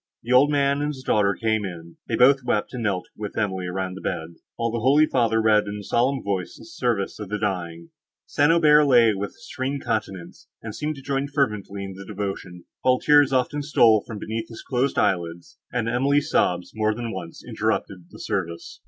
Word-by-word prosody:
The 120 Hz, -, -1 dB
old 135 Hz, +3 st, +6 dB
man 140 Hz, -1 st, +1 dB
and 145 Hz, -, 0 dB
his 135 Hz, -3 st, -6 dB
daughter 100 Hz, -5 st, +2 dB
came; 110 Hz, -1 st, 0 dB, 0.4 s
they 115 Hz, -, -1 dB
both 135 Hz, +3 st, +5 dB
wept, 110 Hz, -2 st, -1 dB
and 125 Hz, -, -4 dB
knelt 100 Hz, -5 st, -1 dB
with 105 Hz, -2 st, -7 dB
Emily 95 Hz, -4 st, -1 dB
round 95 Hz, 0 st, -3 dB
the 95 Hz, -, -9 dB
bed, 80 Hz, +1 st, -4 dB, 0.2 s
while 115 Hz, 0 st, -1 dB
the 115 Hz, -, -2 dB
holy 140 Hz, +6 st, +4 dB
father 115 Hz, -6 st, +1 dB
read 110 Hz, -2 st, +3 dB
in 100 Hz, -, -4 dB
a 105 Hz, -, -7 dB
solemn 130 Hz, +6 st, 0 dB
voice 95 Hz, -3 st, -3 dB
the -, -, -13 dB
service 120 Hz, -, -2 dB
for 105 Hz, -, -7 dB
the 105 Hz, +2 st, -3 dB
dying. 85 Hz, -5 st, -3 dB, 0.4 s
St. 145 Hz, +2 st, +2 dB
Aubert 150 Hz, -3 st, +5 dB
lay 120 Hz, -5 st, +5 dB
with 100 Hz, +1 st, -3 dB
a -, -, -24 dB
serene 135 Hz, +2 st, -2 dB
countenance, 105 Hz, -7 st, -4 dB
and 110 Hz, -2 st, -7 dB
seemed 150 Hz, +5 st, -3 dB
to 135 Hz, -, -12 dB
join 140 Hz, 0 st, -1 dB
fervently 105 Hz, -9 st, -2 dB
in 95 Hz, 0 st, -6 dB
the 95 Hz, +1 st, -10 dB
devotion, 95 Hz, -3 st, -6 dB, 0.2 s
while 130 Hz, 0 st, +3 dB
tears 145 Hz, -1 st, +4 dB
often 135 Hz, +3 st, 0 dB
stole 115 Hz, -7 st, +4 dB
from 110 Hz, -, -6 dB
beneath 110 Hz, +2 st, -5 dB
his 115 Hz, -, -10 dB
closed 130 Hz, +1 st, -1 dB
eyelids, 85 Hz, -2 st, -1 dB
and 120 Hz, -2 st, -1 dB
Emily's 140 Hz, +5 st, +1 dB
sobs 90 Hz, 0 st, +1 dB
more 110 Hz, -1 st, 0 dB
than 120 Hz, -1 st, -4 dB
once 85 Hz, -3 st, -8 dB
interrupted 90 Hz, -3 st, -2 dB
the -, -, -13 dB
service. 85 Hz, -3 st, -4 dB
110 Hz, 205 wpm, -24 LUFS, 100-135 Hz, 0.4 s, old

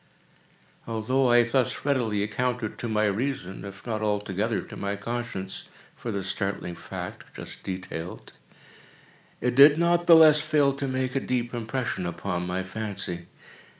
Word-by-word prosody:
Although 120 Hz, +4 st, +1 dB
I 120 Hz, 0 st, +6 dB
thus 120 Hz, +1 st, 0 dB
readily 115 Hz, -8 st, +1 dB
accounted 115 Hz, +1 st, -2 dB
to 120 Hz, -, -3 dB
my 110 Hz, 0 st, +2 dB
reason, 105 Hz, -3 st, -2 dB
if 100 Hz, -1 st, -9 dB
not 110 Hz, -3 st, -2 dB
altogether 105 Hz, +1 st, 0 dB
to -, -, -10 dB
my 100 Hz, 0 st, -2 dB
conscience, 100 Hz, -3 st, -5 dB, 0.3 s
for 115 Hz, -, -5 dB
the 100 Hz, -2 st, -2 dB
startling 95 Hz, -2 st, -3 dB
fact 85 Hz, -, -7 dB
just -, -, -8 dB
detailed, 90 Hz, -2 st, -6 dB, 1.1 s
it 125 Hz, -, +1 dB
did 145 Hz, +3 st, +8 dB
not 170 Hz, +1 st, +2 dB
the 170 Hz, -, +10 dB
less 155 Hz, -2 st, +8 dB
fail 150 Hz, -2 st, +3 dB
to 140 Hz, -, -2 dB
make 130 Hz, 0 st, -1 dB
a -, -, +3 dB
deep 120 Hz, -2 st, -2 dB
impression 115 Hz, -5 st, -2 dB
upon 90 Hz, +1 st, -3 dB
my 90 Hz, +1 st, -2 dB
fancy. 95 Hz, -4 st, -5 dB
110 Hz, 150 wpm, -26 LUFS, 100-130 Hz, 1.1 s, the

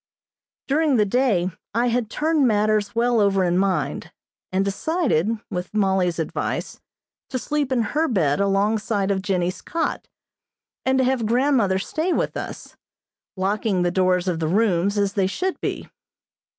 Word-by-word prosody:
During 295 Hz, 0 st, +2 dB
the 215 Hz, -3 st, +3 dB
day 200 Hz, -5 st, +1 dB, 0.2 s
I 240 Hz, +1 st, +2 dB
had 235 Hz, -2 st, -1 dB
turned 305 Hz, 0 st, +1 dB
matters 210 Hz, -1 st, +1 dB
well 235 Hz, 0 st, +2 dB
over 195 Hz, -2 st, +3 dB
in 175 Hz, 0 st, +2 dB
mind, 195 Hz, -1 st, -1 dB, 0.4 s
and 190 Hz, +1 st, +1 dB
decided, 220 Hz, -, 0 dB, 0.2 s
with 180 Hz, +2 st, -5 dB
Mollie's 190 Hz, -4 st, +1 dB
advice, 160 Hz, -, -3 dB, 0.5 s
to 255 Hz, -, -2 dB
sleep 290 Hz, +1 st, -2 dB
in 245 Hz, -3 st, +2 dB
her 310 Hz, +8 st, 0 dB
bed 160 Hz, -, +1 dB
alongside 200 Hz, +1 st, +1 dB
of 190 Hz, -1 st, 0 dB
Jennie's 185 Hz, -2 st, -1 dB
cot, 330 Hz, -1 st, -3 dB, 0.8 s
and 265 Hz, 0 st, +3 dB
to 260 Hz, -, +3 dB
have 250 Hz, -3 st, +1 dB
grandmother 240 Hz, -5 st, +2 dB
stay 315 Hz, -, -2 dB
with -, -, -1 dB
us, -, -, -7 dB, 0.6 s
locking 195 Hz, 0 st, 0 dB
the 175 Hz, -, +1 dB
doors 185 Hz, 0 st, +1 dB
of 175 Hz, -3 st, 0 dB
the 160 Hz, -, -1 dB
rooms, 200 Hz, +1 st, +1 dB
as 200 Hz, -1 st, +1 dB
they 195 Hz, -2 st, +1 dB
should 370 Hz, -, -3 dB
be. -, -, -3 dB
205 Hz, 150 wpm, -23 LUFS, 190-250 Hz, 0.8 s, the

